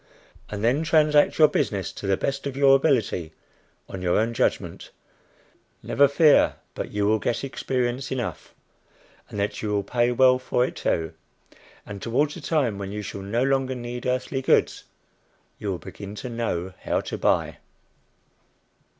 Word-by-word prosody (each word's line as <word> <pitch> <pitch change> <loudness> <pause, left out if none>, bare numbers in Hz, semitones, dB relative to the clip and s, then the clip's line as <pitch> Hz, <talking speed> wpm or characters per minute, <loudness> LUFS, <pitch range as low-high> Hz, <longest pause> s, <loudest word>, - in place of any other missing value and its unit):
and 105 0 -5
then 125 +6 +2
transact 150 -2 +3
your 155 - +7
business 100 -9 -1
to 100 - -7
the 95 -1 +2
best 140 0 -2
of 135 -1 -5
your 135 -1 +6
ability 115 - 0 0.5
on 95 - -7
your 90 -1 +1
own 115 +2 +1
judgment. 100 -8 -1 0.9
Never 140 0 +4
fear 150 +1 +4 0.2
but - - -4
that - - -16
you 105 0 0
will 110 +1 +3
get 115 - -2
experience 130 -1 -2
enough, 130 -2 -5 0.7
and 105 - -6
that 100 +1 -2
you 110 - -3
will 100 -1 0
pay 120 +4 +1
well 130 +1 +4
for 125 -1 +1
it - - -6
too; 80 -1 -1 0.7
and 100 -1 -8
towards 145 +6 0
the 175 - -9
time 135 -10 0
when 100 0 -5
you 105 0 -5
shall 100 0 -6
no 110 +6 -1
longer 135 -1 +1
need 120 0 -5
earthly 130 +1 -1
goods, - - +2 0.7
you 105 - -4
will 95 - -1
begin 100 +3 -9
to 125 - -6
know 95 -6 -3
how - - 0
to - - -5
buy. - - 0
120 Hz, 165 wpm, -24 LUFS, 100-135 Hz, 0.9 s, your